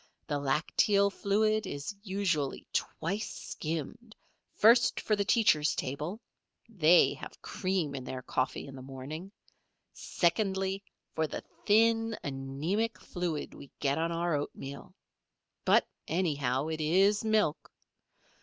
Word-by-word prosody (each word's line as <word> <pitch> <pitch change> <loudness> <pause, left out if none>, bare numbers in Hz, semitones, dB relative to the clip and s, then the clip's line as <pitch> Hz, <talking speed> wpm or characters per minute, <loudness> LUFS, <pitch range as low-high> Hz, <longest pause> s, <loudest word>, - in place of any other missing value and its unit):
The 145 -2 -1
lacteal 200 +8 +2
fluid 215 +1 +1
is 145 +7 -5
usually 190 -8 -1
twice 195 +7 -2
skimmed, 165 - -5 0.4
first 235 +2 +5
for 215 - +1
the 200 - 0
teachers' 155 -8 +3
table 150 +10 -3 0.5
(they 180 -6 +5
have - - -10
cream 185 -6 -1
in 135 -2 -5
their 130 0 -6
coffee 130 +1 -1
in 135 - -10
the 130 - -9
morning), 135 +8 -7 0.6
secondly 190 +1 0 0.3
for 160 -1 0
the - - -6 0.2
thin, 225 +1 +4
anæmic 145 +11 -2
fluid 175 -4 -4
we 140 - -12
get 140 +2 +1
on 165 +1 0
our 170 0 0
oatmeal. 140 -1 -7 0.7
But, - - +5 0.2
anyhow, 145 -6 0
it 160 0 -3
is 195 +7 +3
milk. 215 -8 +1
170 Hz, 120 wpm, -31 LUFS, 145-205 Hz, 0.7 s, first